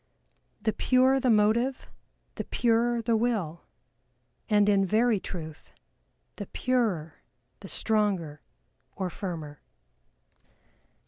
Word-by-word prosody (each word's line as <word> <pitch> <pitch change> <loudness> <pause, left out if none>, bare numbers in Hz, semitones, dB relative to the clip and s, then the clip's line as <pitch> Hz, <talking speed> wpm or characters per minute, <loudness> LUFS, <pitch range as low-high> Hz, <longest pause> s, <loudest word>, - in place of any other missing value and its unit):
The 220 -1 +1
purer 260 +1 +3
the 260 -1 +1
motive 225 +4 +2 0.4
the - - -5
purer 235 0 +1
the 230 0 +2
Will, 215 -8 -1 0.9
and 205 -1 +4
in 200 -1 +4
very 220 +2 +2
truth 160 -5 -8 0.6
the - - -6
purer 215 -12 -1 0.4
the 195 - -10
stronger, 195 -10 0 0.5
or 185 -2 -3
firmer. 160 -6 -6
210 Hz, 95 wpm, -27 LUFS, 180-235 Hz, 0.9 s, and